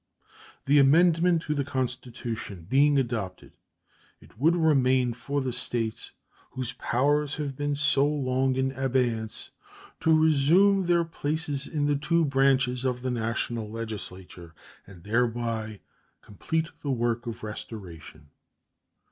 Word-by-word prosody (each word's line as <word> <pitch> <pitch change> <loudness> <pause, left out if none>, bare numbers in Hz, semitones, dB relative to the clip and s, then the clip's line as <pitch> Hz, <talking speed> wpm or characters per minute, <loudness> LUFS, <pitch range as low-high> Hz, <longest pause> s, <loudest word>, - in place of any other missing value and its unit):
The 145 +1 +5
amendment 165 +4 +4
to 150 - -1
the 140 -1 -1
Constitution 125 - -5
being 140 +5 +4
adopted, 115 -8 -3 0.7
it - - -20
would 155 +9 +3
remain 130 -6 +3
for 140 +4 -3
the 130 -2 -3
States 115 -2 -3 0.4
whose 130 -2 -4
powers 145 +3 0
have 145 -3 -4
been 145 +1 -1
so 145 -1 +3
long 130 -3 0
in 130 0 0
abeyance 125 -4 -1 0.5
to 160 - +2
resume 170 +6 +4
their 170 -1 +3
places 150 -3 -3
in 150 -2 -1
the 145 -1 +1
two 170 +3 +1
branches 135 -2 +2
of 125 -1 -2
the 130 - -1
National 115 -1 -2
Legislature, 95 -6 -8 0.3
and 90 -4 -14
thereby 115 -1 -1 0.4
complete 160 +10 -3
the 145 - -4
work 120 -1 -1
of 115 0 -6
restoration. 95 -9 -9
130 Hz, 125 wpm, -27 LUFS, 115-145 Hz, 0.7 s, The